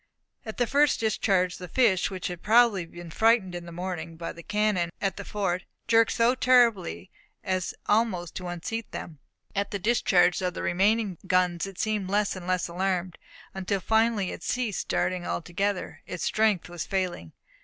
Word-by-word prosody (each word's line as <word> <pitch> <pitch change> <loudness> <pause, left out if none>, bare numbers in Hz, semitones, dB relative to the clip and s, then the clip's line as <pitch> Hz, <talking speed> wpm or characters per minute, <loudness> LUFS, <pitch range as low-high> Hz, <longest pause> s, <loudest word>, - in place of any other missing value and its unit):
At 220 - -6
the 245 - +2
first 285 +4 +3
discharge 195 -5 +1
the 180 - -8
fish, 190 -2 +2
which 190 -2 -6
had 175 -1 -4
probably 215 -5 +4
been 175 0 -10
frightened 220 -2 +3
in 175 -1 -6
the - - -8
morning 170 -2 -5
by 165 0 -5
the 170 - -11
cannon 210 -2 0
at 195 -1 -1
the 200 - -6
fort, 190 -3 -2 0.2
jerked 225 -1 +4
so 235 +2 +3
terribly 230 - +2 0.3
as 185 -1 -2
almost 205 -6 +1
to 185 - -5
unseat 175 +6 -4
them. 155 -4 -8 0.4
At 200 0 0
the 205 - -2
discharge 190 -4 +3
of 180 -1 -2
the - - -4
remaining 195 +1 +1
guns 180 -1 +2
it 195 -2 -10
seemed 210 -3 -1
less 205 0 +1
and 185 -1 -8
less 185 -1 0
alarmed, 180 0 -2 0.3
until 195 +1 -2
finally 220 -2 +1
it - - -8
ceased 240 -2 -2
darting 180 -1 -1
altogether; 185 +3 -2
its 175 - -5
strength 215 -4 +1
was 175 -2 -5
failing. 180 - -2
190 Hz, 175 wpm, -27 LUFS, 175-215 Hz, 0.4 s, probably